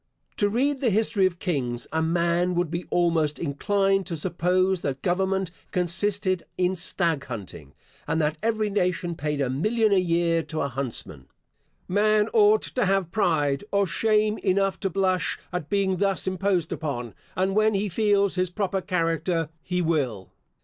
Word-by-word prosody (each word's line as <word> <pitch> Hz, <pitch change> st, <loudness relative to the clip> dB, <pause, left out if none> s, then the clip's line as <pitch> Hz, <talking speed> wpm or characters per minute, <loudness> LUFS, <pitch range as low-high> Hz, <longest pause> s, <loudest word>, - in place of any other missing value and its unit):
To 205 Hz, -2 st, +2 dB
read 270 Hz, +6 st, +1 dB
the 255 Hz, -3 st, +2 dB
history 210 Hz, -2 st, +2 dB
of 175 Hz, -2 st, -6 dB
kings, 125 Hz, -10 st, -2 dB
a 160 Hz, +1 st, 0 dB
man 170 Hz, +2 st, +1 dB
would 175 Hz, -2 st, 0 dB
be 170 Hz, +1 st, -3 dB
almost 165 Hz, -4 st, +1 dB
inclined 195 Hz, +5 st, 0 dB
to 170 Hz, -3 st, -3 dB
suppose 180 Hz, +2 st, +1 dB
that 135 Hz, -1 st, -3 dB
government 190 Hz, 0 st, 0 dB, 0.2 s
consisted 185 Hz, +1 st, 0 dB
in 180 Hz, +1 st, +1 dB
stag 170 Hz, -4 st, 0 dB
hunting, 95 Hz, -, -8 dB, 0.3 s
and 160 Hz, -, 0 dB
that 155 Hz, 0 st, 0 dB
every 220 Hz, -2 st, 0 dB
nation 180 Hz, -3 st, 0 dB
paid 150 Hz, -2 st, -3 dB
a 135 Hz, -, +1 dB
million 215 Hz, -, +1 dB
a 195 Hz, -, +5 dB
year 170 Hz, -1 st, +1 dB
to 160 Hz, -1 st, -4 dB
a 140 Hz, -, -1 dB
huntsman. 120 Hz, -, -5 dB, 0.6 s
Man 210 Hz, +2 st, +2 dB
ought 215 Hz, -1 st, +5 dB
to 245 Hz, -6 st, -1 dB
have 195 Hz, -3 st, +1 dB
pride, 155 Hz, -7 st, +1 dB
or 200 Hz, 0 st, +3 dB
shame 215 Hz, +4 st, +1 dB
enough 195 Hz, 0 st, +1 dB
to 195 Hz, -, -1 dB
blush 185 Hz, 0 st, 0 dB, 0.2 s
at 180 Hz, -4 st, -3 dB
being 195 Hz, -2 st, +1 dB
thus 195 Hz, 0 st, 0 dB
imposed 185 Hz, -2 st, 0 dB
upon, 125 Hz, -7 st, -4 dB, 0.2 s
and 190 Hz, +1 st, +1 dB
when 215 Hz, +1 st, +3 dB
he 200 Hz, +2 st, 0 dB
feels 200 Hz, 0 st, +2 dB
his 185 Hz, -1 st, 0 dB
proper 195 Hz, 0 st, -2 dB
character 165 Hz, -2 st, -1 dB
he 180 Hz, +1 st, -1 dB
will. 130 Hz, -, -1 dB
180 Hz, 165 wpm, -25 LUFS, 165-200 Hz, 0.6 s, a